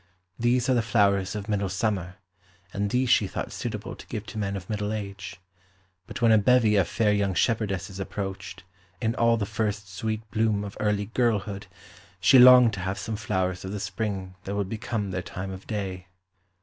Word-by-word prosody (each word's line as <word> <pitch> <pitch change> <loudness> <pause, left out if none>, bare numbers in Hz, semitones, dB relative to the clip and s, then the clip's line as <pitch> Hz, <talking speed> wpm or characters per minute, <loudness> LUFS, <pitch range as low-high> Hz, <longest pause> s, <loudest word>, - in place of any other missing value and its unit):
These 120 +1 +2
are 130 - +3
the 120 - +3
flowers 100 -3 +2
of 105 -1 -5
middle 100 -2 0
summer, 95 -2 -2 0.6
and 100 0 -1
these 125 +4 +1
she 110 -4 +4
thought - - -5
suitable - - -5
to - - -13
give 105 - -5
to 110 - -6
men 100 -1 -2
of 90 -1 -9
middle 105 -1 -2
age. 100 -4 -6 0.7
But - - -6
when 115 - +6
a 110 - +6
bevy 115 -1 +4
of 95 -4 +3
fair 105 -2 +1
young 100 -2 0
shepherdesses 100 -4 -1
approached, 95 -1 -5 0.4
in 115 0 0
all 115 0 +3
the 105 - -1
first 100 -2 -3
sweet 110 +3 -3
bloom 110 -2 +1
of 100 -1 -7
early 105 -1 0
girlhood, 105 -4 0 0.5
she 130 +7 +6
longed 125 -2 +9
to 100 - -4
have 95 +2 -3
some 105 +2 -4
flowers 95 -4 -2
of 95 +1 -5
the 105 - -3
spring 100 -1 -4
that 100 - -3
would 100 -2 -2
become 105 -2 -3
their 90 0 -2
time 95 +1 -6
of 95 0 -9
day. 95 -4 -4
105 Hz, 190 wpm, -26 LUFS, 95-110 Hz, 0.7 s, longed